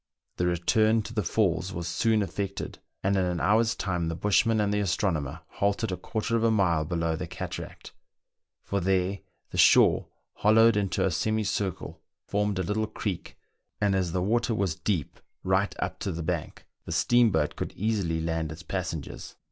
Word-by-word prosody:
The 90 - +1
return 110 +6 +2
to 110 - -8
the 110 - 0
falls 90 -2 0
was 85 -1 -4
soon 110 +5 +2
ef 95 - -5
fected, 100 -1 -4 0.3
and 100 +1 +2
in 95 - +2
an 90 -1 -1
hour's 115 +4 +3
time 90 -4 -2
the 80 - -2
bushman 110 +4 +2
and 105 -1 +1
the 105 - +1
astro 95 0 +1
nomer 75 0 -4
halted 100 +1 0
a - - -1
quarter 110 +4 -2
of 115 - +1
a 115 - +4
mile 90 -8 +2
below 85 0 -1
the - - -5
cataract; - - -7 0.7
for 100 - -1
there 95 +1 +1 0.3
the - - -3
shore, - - +6 0.3
hollowed 115 +1 +5
into 100 -2 0
a 95 - +1
semicircle, 105 0 -2 0.2
formed 105 -1 0
a 95 - 0
little 110 +4 -1
creek, 105 -4 -5 0.4
and 100 -2 +2
as 95 -3 0
the 90 +1 0
water 115 +3 +1
was 95 -5 0
deep 80 -2 -2 0.2
right 95 +2 +1
up - - -3
to - - -2
the 85 0 -4
bank, 85 -1 -4 0.2
the - - -6
steamboat 115 -11 +3
could - - -4
easily 100 -6 -1
land 80 -1 -2
its 80 +1 -9
passengers. - - -5
95 Hz, 180 wpm, -27 LUFS, 85-110 Hz, 0.7 s, shore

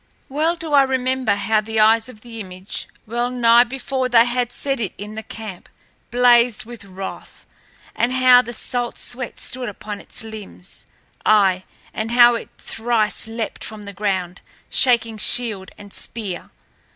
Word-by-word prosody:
Well 310 +5 +1
do 330 -3 -4
I 285 - +8
remember 260 -4 +1
how 215 +1 +1
the 220 +1 -2
eyes 225 +2 +5
of 215 -4 -13
the 230 -1 -9
image, 185 -1 -6 0.2
well 240 +2 -1
nigh 240 -1 +5
before 260 +1 -2
they 235 -1 +6
had 245 0 -1
set 275 0 0
it 210 -6 -2
in 210 +2 -7
the 220 - -5
camp, 215 -5 -9 0.4
blazed 240 -2 +4
with 235 -1 -10
wrath, 190 0 -8 0.5
and 240 - +1
how 255 -1 +6
the 240 -1 -7
salt 240 +1 -3
sweat 245 -1 -3
stood 255 -2 -3
upon 205 0 -7
its - - -4
limbs, 215 -4 -9 0.4
aye, 195 -3 +4 0.3
and 220 +1 -3
how 240 0 +7
it 230 - -5
thrice 225 -2 0
leapt 225 0 -5
from 215 -1 -8
the 200 0 -8
ground, 190 -3 -2 0.3
shaking 230 -3 +2
shield 210 -4 +1
and 205 -1 -12
spear. 200 -6 -5
230 Hz, 160 wpm, -21 LUFS, 210-245 Hz, 0.5 s, I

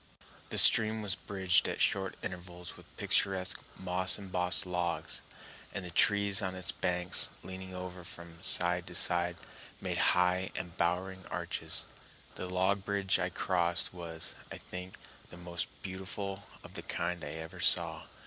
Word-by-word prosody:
The - - -1
stream 110 0 +8
was 100 -2 +1
bridged 95 -3 +2
at - - -4
short 95 -1 +2
intervals 90 -1 -7
with - - -16
picturesque, 95 -3 +1 0.2
moss 95 0 +3
embossed 90 -2 0
logs, 90 -2 -3 0.5
and 95 - -4
the 90 - -7
trees 100 +2 +4
on 95 -2 -3
its 90 -2 0
banks, 90 0 +3
leaning 95 0 -8
over 90 0 -7
from 85 -1 -9
side 90 0 +1
to 90 - -8
side, 85 0 +2 0.4
made - - -3 0.2
high 90 +1 +2
embowering 90 +1 -2
arches. - - -4 0.5
The 90 - -6
log 95 +2 +1
bridge 100 -1 +1
I 90 - 0
crossed 85 -1 0
was, 85 -2 -7 0.2
I - - -6
think, 90 0 -8 0.3
the 85 - -11
most 85 -1 -4 0.2
beautiful 95 +1 -5 0.2
of - - -12
the - - -5
kind 90 -1 -3
I 75 - -5
ever 80 0 -8
saw. - - +2
90 Hz, 150 wpm, -32 LUFS, 90-95 Hz, 0.5 s, stream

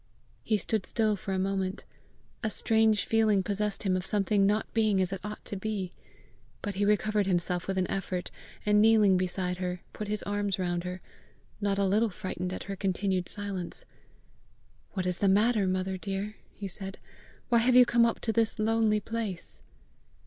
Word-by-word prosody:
He 215 - +2
stood 210 +1 -1
still 220 -2 +1
for 200 0 -6
a 190 - 0
moment; 190 0 -1 0.6
a 220 - +1
strange 220 0 +2
feeling 215 -3 +3
possessed 205 +1 -1
him 190 -2 +2
of 185 - -1
something 200 0 +2
not 210 +2 0
being 215 -4 +3
as 185 0 0
it 195 - -5
ought 210 +1 -7
to - - -5
be. 195 -2 -3 0.7
But 205 - -2
he 200 +2 0
recovered 210 0 +2
himself 180 -1 0
with 190 0 -1
an 185 - +2
effort, 185 -2 -3 0.3
and 210 0 +5
kneeling 215 -3 +6
beside 180 0 -1
her, 180 -1 -3
put 210 - -5
his 210 0 -2
arms 205 -1 -1
round 175 -1 -1
her 180 0 -5 0.6
not 200 -1 +1
a 200 - +2
little 215 +4 +3
frightened 185 -2 -4
at - - -5
her 195 - -5
continued 190 -1 -1
silence. 200 -4 -5 1.1
"What 185 -3 -2
is 180 -1 -1
the 200 - +2
matter, 210 +1 +3
mother 185 0 -1
dear?" 195 +2 -4 0.2
he 200 - -6
said. 195 +1 -6 0.5
"Why 235 - +5
have 245 +2 +3
you 250 0 +9
come 235 0 +4
up 230 -1 +1
to 225 - 0
this 225 -1 +1
lonely 220 -1 +2
place?" 215 -5 -5
200 Hz, 180 wpm, -29 LUFS, 185-215 Hz, 1.1 s, you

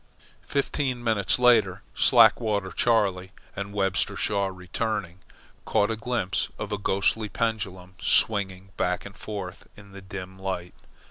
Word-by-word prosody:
Fifteen 135 -3 -1
minutes 110 -4 +2
later, 115 -6 +4
Slackwater 110 -5 +4
Charley 100 -5 +1 0.2
and 100 0 -5
Webster 95 -2 0
Shaw 100 -2 0
returning, 95 0 -3 0.4
caught 105 +2 +1
a - - 0
glimpse 110 -4 -1
of 105 -1 -5
a 105 - -2
ghostly 100 +2 +1
pendulum 95 -6 -3
swinging 95 -3 +2
back 90 0 -1
and 100 0 -10
forth 95 -4 -7
in 100 -1 -14
the 100 0 -10
dim 95 -1 -8
light. 95 -2 -4
100 Hz, 130 wpm, -26 LUFS, 95-110 Hz, 0.4 s, later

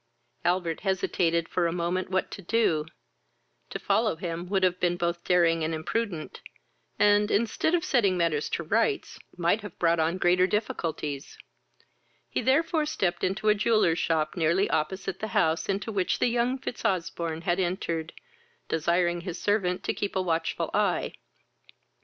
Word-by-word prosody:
Albert 175 -2 0
hesitated 170 -3 0
for 175 -2 0
a - - -1
moment 175 +2 -1
what 190 0 -1
to - - -7
do: 170 -6 +1 0.8
to - - -4
follow - - +1
him 170 +1 -5
would 190 -1 +1
have 180 -1 +2
been 175 -1 +1
both 170 -1 -2
daring 170 -2 +3
and 160 +1 -1
imprudent, 170 +1 -3 0.6
and, 205 0 +4
instead 230 +10 +1
of 345 0 -1
setting 200 - +2
matters 165 -4 0
to 170 - -2
rights, 230 - 0 0.2
might 175 +5 +2
have 205 -4 -9
brought 170 -1 +2
on 165 +3 +1
greater 180 0 +3
difficulties; 160 -9 -3 0.9
he - - -2
therefore 305 +3 +2
stepped 190 - -1
into 195 +3 -1
a 210 - +7
jeweller's 210 -6 +2
shop 155 -2 0
nearly 175 +3 +2
opposite 190 +4 -2
the 215 - -3
house 160 +4 +1
into 200 +3 -1
which 190 -4 0
the - - +2
young 240 +2 +1
Fitzosbourne 170 -8 -2
had 175 +1 +1
entered, 170 -3 -2 0.6
desiring 175 +2 +1
his 175 -1 -6
servant 190 -3 0
to - - -1
keep 205 - -3
a 190 - +2
watchful 165 -2 -1
eye. - - +1
180 Hz, 155 wpm, -27 LUFS, 165-205 Hz, 0.9 s, a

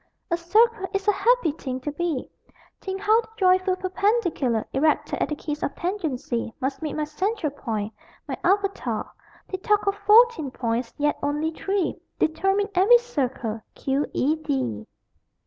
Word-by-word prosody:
A - - +4
circle 420 +4 +3
is 390 +1 -1
a - - +7
happy 415 -3 +3
thing 260 -3 -5
to 295 - -3
be 310 -3 -2 0.5
Think 385 0 -5
how 435 +3 +4
the 455 - -16
joyful 370 -1 +3
perpendicular 370 - 0
Erected 305 +3 +1
at - - +1
the 300 - -1
kiss 300 0 -5
of 280 - -2
tangency 295 - -2
Must 270 +2 -2
meet 305 -2 -3
my 305 - -1
central 350 +2 -2
point, 220 -6 -4 0.3
my - - -2
avatar! 395 +2 0 0.4
They 375 - -4
talk 420 +2 +2
of 400 - +2
14 420 - +5
points: 235 -1 -2
yet 295 0 +1
only 295 +2 0
3 385 +2 -2 0.2
Determine 390 +6 +1
every 390 +6 +7
circle: 260 - -3
=Q. 275 +2 -1
E. 300 +5 +1
D. 125 - -2
335 Hz, 155 wpm, -25 LUFS, 275-400 Hz, 0.5 s, a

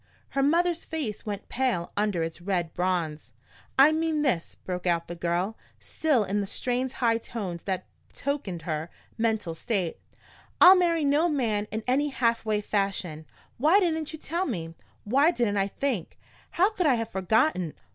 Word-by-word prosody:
Her 275 - 0
mother's 340 +4 +2
face 275 -11 -4
went 205 -1 -4
pale 245 -10 -1
under 205 -5 0
its 165 +1 -5
red 175 -3 -1
bronze. 175 -4 -2 0.4
"I 275 +3 +8
mean 315 -1 0
this," 210 - 0
broke 180 0 -5
out 170 -1 +1
the 175 - -5
girl, 175 +5 -2 0.2
still 295 -8 +1
in 205 +1 -1
the 200 - -3
strained 250 +4 -1
high 230 -2 +1
tones 195 -8 -5
that 185 -2 -2 0.2
betokened 235 - -4
her 160 0 -3 0.3
mental 220 -6 0
state: 185 -1 -2 0.6
"I'll 370 +2 +10
marry 335 -4 +2
no 295 +5 +3
man 220 -8 0
in 220 +1 -4
any 275 +4 +2
halfway 230 -5 0
fashion! 195 -7 -2 0.3
Why 315 +9 +5
didn't 320 -5 0
you 315 - -7
tell 340 +4 -2
me? 165 - -4 0.3
Why 275 +9 +4
didn't 235 -11 0
I 195 0 +2
think? 235 - -3 0.3
How 380 +5 +2
could 365 -6 0
I 265 - +5
have 230 -1 -3
forgotten? 190 - +1
220 Hz, 165 wpm, -27 LUFS, 180-290 Hz, 0.6 s, I'll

